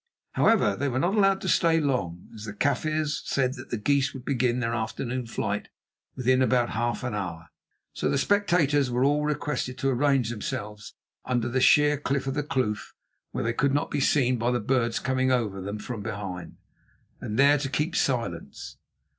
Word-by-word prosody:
However, 225 -2 +3
they 140 - -1
were 130 - -2
not 175 +8 +1
allowed 195 -2 +3
to - - -4
stay 165 -2 +3
long, 100 - -2
as 110 -1 -9
the 105 - -6
Kaffirs 150 +4 0
said 130 -2 0
that - - -10
the 120 - -2
geese 140 +5 +1
would 130 -1 -9
begin 125 -2 +1
their 115 -1 -1
afternoon 120 +2 -3
flight 115 - -3 0.5
within 130 0 +2
about 125 -2 +2
half 120 +2 -1
an 120 -3 -3
hour. 85 -6 -5 0.4
So - - -1
the - - +1
spectators 155 -7 +2
were 125 +1 +1
all 145 +2 +2
requested 145 -4 -2
to 135 - 0
arrange 135 -2 +2
themselves 105 -1 -6 0.3
under 120 -2 -1
the 130 +2 0
sheer 150 +2 +5
cliff 140 -2 -1
of 135 - -2
the 150 - 0
kloof, 130 -7 -2 0.3
where - - -3
they 115 0 0
could 140 +3 +1
not 155 +3 -1
be 145 - 0
seen 130 -3 +2
by 120 +2 +1
the 125 0 +1
birds 120 0 0
coming 130 0 0
over 110 -6 0
them 100 +3 -4
from 110 +1 -6
behind, 100 -4 -6 0.6
and 105 - -4
there 140 +2 +5
to 135 -1 -3
keep 150 +5 -1
silence. 115 -11 -2
130 Hz, 190 wpm, -26 LUFS, 115-145 Hz, 0.6 s, sheer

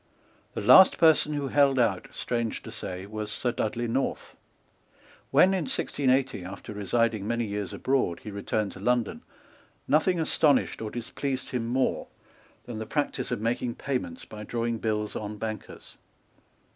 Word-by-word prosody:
The - - -2
last 190 - +8
person 160 -2 +4
who 145 -2 -2
held 140 -1 +4
out, 110 -7 +1
strange 115 -2 -3
to - - -8
say, 90 +1 -6
was 105 +1 -5
Sir 120 +4 0
Dudley 120 +1 -2
North. 130 +4 -2 0.9
When, 190 - +5
in 185 -5 0
1680, 130 -4 0
after 100 +3 -8
residing 105 +1 0
many 120 0 0
years 100 -2 -4
abroad, 130 -11 0
he 105 - -6
returned 100 +1 -2
to - - -11
London, 120 +2 0 0.7
nothing 165 +4 +3
astonished 150 -6 +2
or 110 - -3
displeased 130 +3 -4
him 120 -2 -2
more 130 +2 0 0.6
than 115 -3 -6
the 110 - -5
practice 145 +3 -1
of 120 -4 -2
making 120 +1 -1
payments 125 -11 -4
by 105 0 -9
drawing 115 +1 -2
bills 105 -1 -2
on 105 0 -5
bankers. 110 -1 -7
115 Hz, 150 wpm, -27 LUFS, 105-135 Hz, 0.9 s, last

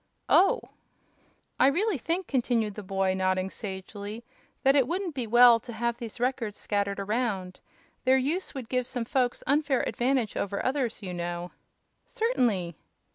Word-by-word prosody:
"Oh!" 390 - +5 1.0
"I - - +6
really 360 +3 +1
think," 340 +8 -1
continued 235 -6 0
the 210 - -7
boy, 195 -1 0
nodding 185 0 0
sagely, 205 +2 -7 0.4
"that 270 +1 +5
it 270 -4 +4
wouldn't 360 0 -2
be 255 -4 -3
well 240 +1 +7
to 240 - -9
have 235 +1 -2
these 235 -1 -7
Records 240 -4 -1
scattered 200 -1 -1
around. 200 -3 -2 0.4
Their 260 +1 +5
use 300 +7 -2
would 260 -4 -5
give 250 0 -1
some 245 -3 -3
folks 245 0 0
unfair 285 -2 +2
advantage 245 -3 0
over 200 0 -2
others, 255 -5 -1
you 185 -2 -4
know." 175 0 -4 0.6
"Certainly." 240 - 0
235 Hz, 150 wpm, -28 LUFS, 200-265 Hz, 1.0 s, well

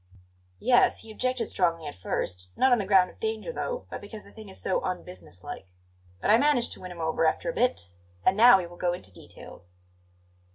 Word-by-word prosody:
"Yes, 245 +1 +3
he 225 - -11
objected 255 +1 -1
strongly 165 -5 0
at 145 - -5
first; 90 0 -4
not 260 - +4
on 245 - +5
the 200 - -3
ground 190 -2 +5
of - - -24
danger, 445 +2 -3
though, - - -4
but - - -6
because 210 +1 -10
the - - -16
thing 215 -2 -12
is 190 - -7
'so 190 - 0
unbusiness 180 - -7
like.' - - -8 0.5
But - - +2
I 225 - +6
managed 285 -4 +2
to - - -6
win 185 -1 -8
him 175 - -10
over 160 0 0
after 160 - +1
a - - -12
bit. 245 - 0 0.3
And 190 - +4
now 230 0 +8
we 185 - -3
will 175 0 -12
go 175 0 0
into 175 - -9
details." 90 0 -12
190 Hz, 215 wpm, -27 LUFS, 165-245 Hz, 0.5 s, now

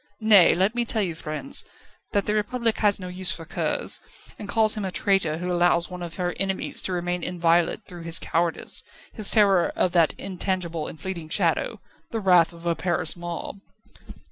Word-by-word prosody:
Nay; 205 -5 +7
let 190 +4 +2
me 240 0 +1
tell 225 -2 0
you, 175 -3 -2
friends, 160 - -3 0.5
that 200 -1 +1
the 210 - 0
Republic 225 +2 0
has 205 -2 +2
no 185 - -6
use 180 -1 -2
for 165 0 -5
curs, - - -1 0.4
and 205 - -8
calls 220 +1 +4
him 210 - -4
a 190 - -2
traitor 185 -5 +1
who 180 +2 -3
allows 175 0 +2
one 180 0 -7
of 170 -1 -6
her 180 -1 -2
enemies 190 -1 0
to - - -3
remain 175 0 -2
inviolate 170 -1 +1
through 175 -1 -10
his 165 0 +3
cowardice, 170 0 -1 0.3
his 215 -4 +3
terror 200 -5 +4
of 180 - +1
that 170 -3 +3
intangible 180 -4 -3
and 160 - -9
fleeting 170 -2 -6
shadow - - 0 0.3
the 225 - -3
wrath 180 -5 +4
of 170 0 -14
a 170 - +2
Paris 170 -2 -1
mob." 175 +2 -6
180 Hz, 190 wpm, -25 LUFS, 170-200 Hz, 0.5 s, Nay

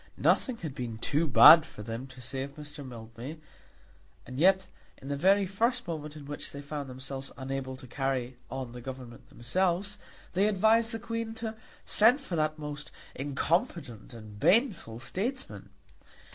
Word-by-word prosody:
Nothing 255 -4 +2
had 160 -9 -6
been 120 -4 -5
too 150 +8 +1
bad 150 +6 +10
for 105 -8 -10
them 115 +4 -5
to 130 -1 -12
say 130 +2 -4
of 140 +1 -6
Mr. 150 -1 -8
Mildmay, 120 +3 -8 0.9
and 130 +1 -7
yet, 190 +3 +5 0.3
in 135 - -9
the 140 - 0
very 195 +7 +4
first 230 +5 0
moment 155 -2 -5
in 150 -2 -10
which 145 +1 -6
they 140 - -8
found 145 -1 -5
themselves 135 +1 -6
unable 130 -1 -4
to 130 - -12
carry 130 -1 -2
on 130 -2 -5
the 125 0 -9
Government 125 -2 -9
themselves, 180 +9 0 0.3
they 195 +4 +3
advised 220 +3 +3
the 225 - -3
Queen 230 0 -4
to 225 -1 -4 0.3
send 230 +6 +6
for 265 -11 -5
that 155 -1 0
most 150 -1 -6 0.2
incompetent 145 - -1
and 110 -3 -11
baneful 195 - +2
statesman! 235 - -4
145 Hz, 160 wpm, -30 LUFS, 130-190 Hz, 0.9 s, bad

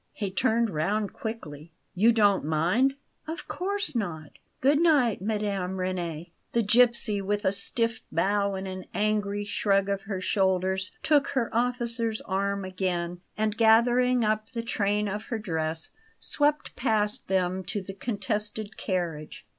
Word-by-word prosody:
He 200 -3 -3
turned 230 +2 +1
round 195 +7 -1
quickly. 165 -9 -7 0.2
"You 215 +5 +5
don't 205 -4 +3
mind?" 175 - +2 0.3
"Of 325 +3 -6
course 400 +3 -2
not. 160 -9 -3 0.3
Good 285 +3 +4
night, 285 - +3
Mme. 200 -3 -1
Reni!" 175 -3 -3 0.2
The 235 - +2
gipsy, 230 -2 +3
with 205 +1 -1
a 190 - +4
stiff 230 +3 0
bow 200 +4 +1
and 190 0 -4
an 185 -1 -6
angry 205 -1 0
shrug 200 -1 +1
of 200 -1 -1
her 195 -3 -2
shoulders, 190 0 +1
took 290 -2 +3
her 250 -4 -1
officer's 235 -2 0
arm 200 0 -1
again, 180 -2 -2 0.2
and, 215 0 0
gathering 240 +2 +4
up 215 0 0
the 230 -1 -3
train 210 -2 0
of 205 +2 -4
her 230 - -3
dress, 160 -5 -3 0.3
swept 295 0 0
past 215 -4 0
them 185 0 0
to 205 - -2
the 195 0 -7
contested 210 0 -3
carriage. 170 -6 -3
205 Hz, 145 wpm, -27 LUFS, 185-230 Hz, 0.3 s, You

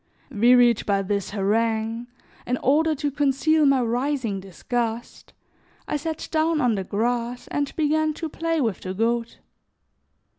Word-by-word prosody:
Wearied 240 +1 +4
by 200 -1 +1
this 200 0 -2
harangue, 225 +3 -1 0.4
in 250 - 0
order 310 +5 +2
to 290 0 -2
conceal 290 +2 +2
my 275 -2 +4
rising 240 -3 -1
disgust, 230 +5 -4 0.6
I - - -2
sat 315 +2 -4
down 315 0 +1
on 245 -5 +2
the 195 -2 -2
grass 235 +4 -2
and 285 -1 -1
began 310 0 +1
to 325 - -4
play 330 +1 -2
with 225 -9 -1
the 185 0 -5
goat. 230 +2 -1
245 Hz, 140 wpm, -24 LUFS, 225-295 Hz, 0.6 s, Wearied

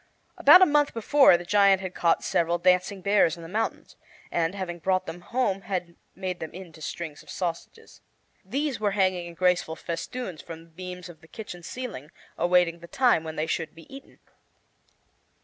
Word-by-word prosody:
About 370 - +8
a - - +8
month 295 -4 +2
before 235 -2 +5
the 175 - -9
giant 200 0 +4
had 185 -1 -6
caught 170 -1 +1
several 170 +1 +1
dancing 180 +2 +2
bears 200 -4 +3
in 170 - -10
the - - -8
mountains, 215 +6 -3 0.4
and, 170 +2 0
having 175 -3 -5
brought 185 +2 0
them 165 +1 -7
home, 195 -1 -1
had 180 -2 -4 0.2
made 185 -2 -4
them 160 - -6
into 170 -4 -11
strings 155 -1 -6
of - - -19
sausages. 180 - -6 0.4
These 275 +7 -2
were 205 -2 0
hanging 185 -2 +1
in 170 - -10
graceful 180 -2 +1
festoons 170 +3 -5
from 165 -1 -10
the 165 - -21
beams 180 +1 -8
of 170 -2 -14
the 160 - -17
kitchen 180 -2 -9
ceiling, 185 - -7 0.3
awaiting 175 -1 +2
the 170 - -12
time 245 -7 +2
when 160 -1 -6
they 155 - -1
should 160 -1 -3
be 165 -1 -13
eaten. 275 - -13
180 Hz, 185 wpm, -26 LUFS, 170-200 Hz, 0.4 s, About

